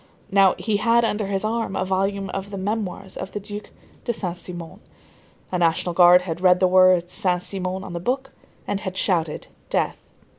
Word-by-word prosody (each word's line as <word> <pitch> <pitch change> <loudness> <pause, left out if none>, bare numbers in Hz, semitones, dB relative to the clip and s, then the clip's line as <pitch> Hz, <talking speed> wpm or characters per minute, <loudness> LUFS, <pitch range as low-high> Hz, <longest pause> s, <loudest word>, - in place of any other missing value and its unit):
Now, 195 -1 +5
he 215 -3 0
had 230 +2 +3
under 210 -2 -1
his 195 0 -1
arm 225 -2 -1
a 185 - 0
volume 195 +1 -1
of 195 +1 -5
the 200 - -6
memoirs 195 -1 -3
of - - -6
the 205 - -3
Duc 205 +1 -8 0.3
de 240 - -1
Saint 185 -6 -3
Simon. 175 +1 -8 0.7
A 180 - 0
National 170 +1 +1
Guard 180 +1 +7
had 175 -1 -5
read 180 -1 +5
the 185 - +4
words 185 -1 +4
Saint 180 -1 0
Simon 190 -1 -3
on 185 - -8
the 170 - -3
book, 265 +8 -2 0.3
and 200 - -2
had 185 -2 -5
shouted: 165 -5 0 0.2
"Death!" - - 0
190 Hz, 190 wpm, -23 LUFS, 180-205 Hz, 0.7 s, Guard